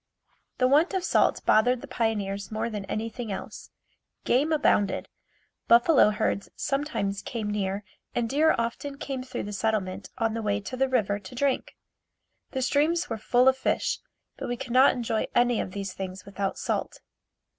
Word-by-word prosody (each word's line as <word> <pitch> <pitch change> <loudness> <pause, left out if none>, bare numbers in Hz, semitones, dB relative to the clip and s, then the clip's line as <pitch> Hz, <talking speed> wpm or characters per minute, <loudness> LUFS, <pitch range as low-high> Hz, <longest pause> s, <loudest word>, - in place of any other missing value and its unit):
The 255 - +3
want 310 +8 +3
of 375 - 0
salt - - +2
bothered 245 +3 +4
the 285 - -9
pioneers 205 -5 -2
more 220 +2 -2
than 205 -2 -4
anything 225 +2 -4
else. 195 - -7 0.6
Game 280 +6 +2
abounded. 205 -10 +2 0.6
Buffalo 240 +2 +6
herds 210 -2 -1
sometimes 275 -9 -2
came 220 -3 -4
near 200 0 -2 0.3
and 235 -1 +1
deer 305 +6 +3
often 235 +5 -3
came 270 -2 -4
through 255 - -5
the 205 - -6
settlement 200 -2 -1
on 225 -2 0
the 230 - -2
way 205 -1 0
to 210 +5 -6
the 265 +1 +1
river 205 -5 +1
to 205 +5 -11
drink. 275 +1 0 0.7
The 260 -1 -2
streams 320 +7 +1
were 225 - -2
full 245 +4 +3
of 265 - +6
fish, 265 - 0 0.4
but - - -5
we 245 - -2
could 245 -1 -6
not 260 +2 +6
enjoy 225 -3 -1
any 240 -1 +3
of - - -4
these 195 0 -5
things 190 -1 -6
without 200 0 -3
salt. - - -2
230 Hz, 170 wpm, -27 LUFS, 205-260 Hz, 0.7 s, Buffalo